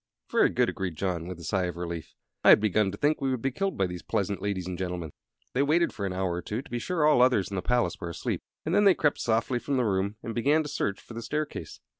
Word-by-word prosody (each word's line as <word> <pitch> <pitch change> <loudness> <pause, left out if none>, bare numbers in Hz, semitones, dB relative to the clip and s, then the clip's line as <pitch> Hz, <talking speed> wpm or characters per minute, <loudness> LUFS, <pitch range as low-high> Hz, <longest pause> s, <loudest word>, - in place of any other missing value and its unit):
"Very - - +4
good," - - +2
agreed 90 -4 -3
John, 85 -1 -2
with 90 -2 -6
a - - -10
sigh 95 +1 0
of 90 -1 -4
relief. 85 -2 -5 0.3
"I - - +7
had - - +9
begun 105 -1 +2
to 100 - -6
think 150 +4 +1
we 135 - +1
would 130 -3 -2
be 135 - +1
killed 195 +7 -2
by 95 - +2
these 90 -1 -5
pleasant 100 -1 -2
ladies 100 -3 -2
and 90 0 -4
gentlemen." 90 -3 -4 0.4
They 130 - +2
waited 160 +4 +2
for 100 -4 -3
an - - -3
hour 95 -1 -1
or 90 - -3
two, 110 +8 -4
to - - -17
be 120 - -1
sure 160 +4 0
all 150 -5 +5
others 125 -6 +4
in - - -3
the 95 - -1
palace 120 -6 0
were 85 - -4
asleep, 85 - -3 0.2
and 160 - -1
then 205 +2 +4
they 195 -3 +7
crept 150 -2 +1
softly 115 +2 +1
from 135 +3 -1
the 125 - +2
room 100 0 0
and 115 - -4
began 145 +7 +3
to 150 - -6
search 100 -7 -2
for - - -12
the 115 - -5
staircase. 150 +5 -4
105 Hz, 280 wpm, -28 LUFS, 90-135 Hz, 0.4 s, had